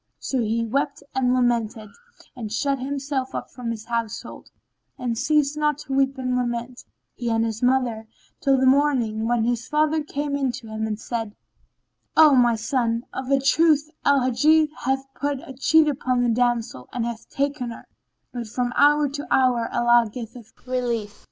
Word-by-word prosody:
So 265 - -2
he 230 +1 0
wept 270 +5 -2
and 260 -1 +1
lamented 235 -4 0 0.4
and 225 -4 -6
shut 275 +4 0
himself 270 0 -3
up - - -5
from 245 -2 -6
his 225 -1 -5
household; 230 -2 -4 0.5
and 240 -2 -2
ceased 290 +3 +1
not 300 -1 +1
to 295 -2 -7
weep 270 0 +1
and 255 -1 -1
lament, 240 0 -3 0.3
he 240 -1 -4
and 225 0 +1
his 225 -1 -4
mother, 245 -3 +1 0.3
till 270 -1 +3
the 260 - +2
morning, 260 -5 +2
when 240 -1 +1
his 240 +1 -1
father 310 +1 +1
came 290 -1 -3
in 270 -3 0
to 225 - -8
him 220 0 -3
and 215 -1 -3
said, 225 -3 -4 0.8
"O 310 -2 +8
my 240 -3 +4
son, 230 0 -1
of 260 0 -5
a 275 -1 +3
truth, 300 +2 +3
Al 280 -1 +4
Hajjaj 300 +5 +3
hath 265 +2 -1
put 285 -1 -2
a 270 - -8
cheat 310 +4 +4
upon 255 -3 0
the 240 - +2
damsel 230 - 0
and 240 -2 -2
hath 235 -1 -6
taken 275 -3 -2
her; 230 - -9 0.5
but 240 -2 -5
from 245 +2 -2
hour 295 0 +5
to 285 +1 -6
hour 250 -3 +3
Allah 240 -1 +3
giveth 230 -1 -9
relief." 240 -5 -2
250 Hz, 175 wpm, -23 LUFS, 230-275 Hz, 0.8 s, O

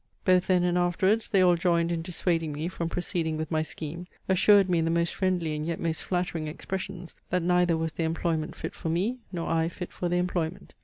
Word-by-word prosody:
Both 185 -1 +4
then 180 -2 +3
and 180 0 +2
afterwards 190 +5 +2
they 195 -2 +4
all 180 -1 +5
joined 170 -1 +1
in 170 -1 -1
dissuading 165 -2 -1
me 155 +4 -3
from 170 -2 -3
proceeding 165 -3 -2
with 155 +1 -4
my 155 -1 +2
scheme; 160 +2 -6 0.2
assured 195 +1 +5
me 175 -2 +2
in 165 - +1
the - - +1
most 170 0 +1
friendly 180 -5 0
and 150 - -3
yet 165 +1 -2
most 165 -1 -1
flattering 175 -3 -2
expressions, 185 +2 -5 0.2
that 180 -1 +1
neither 180 -1 +3
was 160 -1 -2
the 165 - -2
employment 160 -1 -1
fit - - -5
for 165 - -4
me, 200 +10 0
nor 170 -3 -3
I 165 0 +1
fit 175 +1 -7
for 175 - -2
the 175 - +1
employment. 180 0 -2
170 Hz, 220 wpm, -27 LUFS, 165-180 Hz, 0.2 s, all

